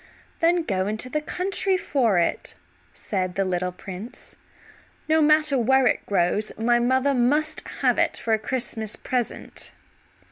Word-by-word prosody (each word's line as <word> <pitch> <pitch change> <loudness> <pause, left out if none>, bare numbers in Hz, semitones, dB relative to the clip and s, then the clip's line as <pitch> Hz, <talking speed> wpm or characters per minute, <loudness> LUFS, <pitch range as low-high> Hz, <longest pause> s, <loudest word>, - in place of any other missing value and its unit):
"Then 340 +1 +3
go 190 -8 -1
into 215 +4 -1
the 300 +3 -1
country 380 +4 0
for 245 - +1
it," 170 - -1 0.4
said 185 -3 -3
the 195 - 0
little 180 0 -1
prince. 190 +6 -9 0.7
"No 315 0 +3
matter 305 -2 +4
where 265 +3 +3
it - - +1
grows, 200 +2 0
my 240 +2 +2
mother 260 +3 +2
must 285 +5 +1 0.2
have - - +2
it - - +1
for 225 - -1
a 220 - +2
Christmas 220 -2 -1
present." 245 -3 -4
240 Hz, 145 wpm, -24 LUFS, 200-295 Hz, 0.7 s, matter